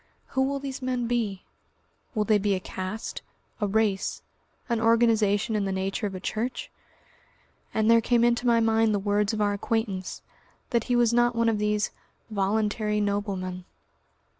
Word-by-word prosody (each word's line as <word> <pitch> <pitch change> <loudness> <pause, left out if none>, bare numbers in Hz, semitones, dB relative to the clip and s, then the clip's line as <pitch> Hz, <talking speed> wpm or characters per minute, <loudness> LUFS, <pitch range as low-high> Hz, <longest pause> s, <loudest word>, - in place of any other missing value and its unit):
Who 265 - 0
will 275 +1 +1
these 275 -1 -6
men 255 -1 -1
be? 225 -5 -1 0.7
Will 215 - +2
they 210 0 +3
be 200 0 +1
a - - -2
caste? 185 +4 -5 0.4
a 210 - 0
race? 205 -1 0 0.4
an 235 -2 0
organisation 225 -2 +3
in 205 -2 0
the 195 - -1
nature 195 +3 -1
of 195 - -6
a - - -5
Church?... 230 +7 -3 1.0
And 220 0 +1
there 230 0 +6
came 235 0 +2
into 240 +1 +2
my 235 -1 +5
mind 225 -1 +3
the - - +2
words 205 +1 +1
of 215 -1 -2
our 205 -1 +2
acquaintance, 200 -2 -2 0.5
that 235 -3 +1
he 245 - +1
was 240 -1 +3
not 240 0 +3
one 230 0 +3
of 215 -2 0
these 210 0 0 0.4
"voluntary 210 +1 0
noblemen." 200 -3 -2
215 Hz, 165 wpm, -26 LUFS, 205-230 Hz, 1.0 s, there